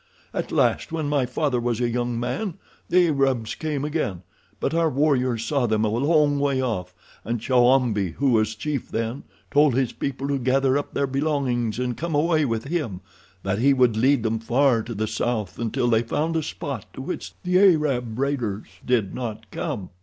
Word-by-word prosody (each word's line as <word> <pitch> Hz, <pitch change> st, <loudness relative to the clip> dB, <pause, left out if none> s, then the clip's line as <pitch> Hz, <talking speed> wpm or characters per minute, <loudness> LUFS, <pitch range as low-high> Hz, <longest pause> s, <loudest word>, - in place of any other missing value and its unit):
At -, -, -3 dB
last, -, -, +1 dB
when 160 Hz, -2 st, -2 dB
my 145 Hz, -3 st, +1 dB
father 130 Hz, 0 st, 0 dB
was 120 Hz, -1 st, -1 dB
a 120 Hz, -, +1 dB
young 120 Hz, 0 st, -1 dB
man, 160 Hz, -, -2 dB, 0.3 s
the 180 Hz, -1 st, +4 dB
Arabs 135 Hz, -6 st, +1 dB
came 150 Hz, -3 st, -3 dB
again, 145 Hz, -, -2 dB, 0.4 s
but -, -, -1 dB
our 165 Hz, -1 st, +2 dB
warriors 130 Hz, -5 st, +1 dB
saw 140 Hz, -5 st, +1 dB
them 110 Hz, 0 st, +1 dB
a -, -, +1 dB
long 145 Hz, +5 st, +2 dB
way 140 Hz, -2 st, +1 dB
off, 95 Hz, -8 st, -2 dB, 0.3 s
and 115 Hz, +2 st, -2 dB
Chowambi, 120 Hz, -6 st, +3 dB
who 140 Hz, -1 st, +1 dB
was 110 Hz, -1 st, +2 dB
chief 140 Hz, +3 st, -3 dB
then, 115 Hz, +4 st, -3 dB, 0.3 s
told 145 Hz, -3 st, +4 dB
his 130 Hz, -2 st, 0 dB
people 135 Hz, 0 st, -3 dB
to 140 Hz, -1 st, 0 dB
gather 130 Hz, +1 st, +2 dB
up 145 Hz, -, -3 dB
their 140 Hz, -, +2 dB
belongings 135 Hz, -5 st, -1 dB
and 125 Hz, -1 st, -1 dB
come 165 Hz, +2 st, -3 dB
away 155 Hz, 0 st, +3 dB
with 115 Hz, -3 st, -1 dB
him—that 95 Hz, -, -5 dB
he 135 Hz, +3 st, +4 dB
would 125 Hz, -4 st, +3 dB
lead 130 Hz, +2 st, +3 dB
them 110 Hz, 0 st, 0 dB
far 120 Hz, +1 st, +2 dB
to 115 Hz, +1 st, -6 dB
the 110 Hz, +2 st, -1 dB
south 110 Hz, -2 st, -2 dB
until 120 Hz, +1 st, 0 dB
they 115 Hz, -2 st, +3 dB
found 155 Hz, +8 st, -1 dB
a 160 Hz, -, +2 dB
spot 145 Hz, -2 st, -6 dB
to -, -, -7 dB
which 180 Hz, -, -5 dB
the 180 Hz, 0 st, +3 dB
Arab 145 Hz, -, +3 dB
raiders 125 Hz, -7 st, -1 dB, 0.2 s
did 115 Hz, -6 st, +1 dB
not 110 Hz, -3 st, -6 dB
come. 95 Hz, -3 st, -4 dB
125 Hz, 185 wpm, -24 LUFS, 115-145 Hz, 0.4 s, the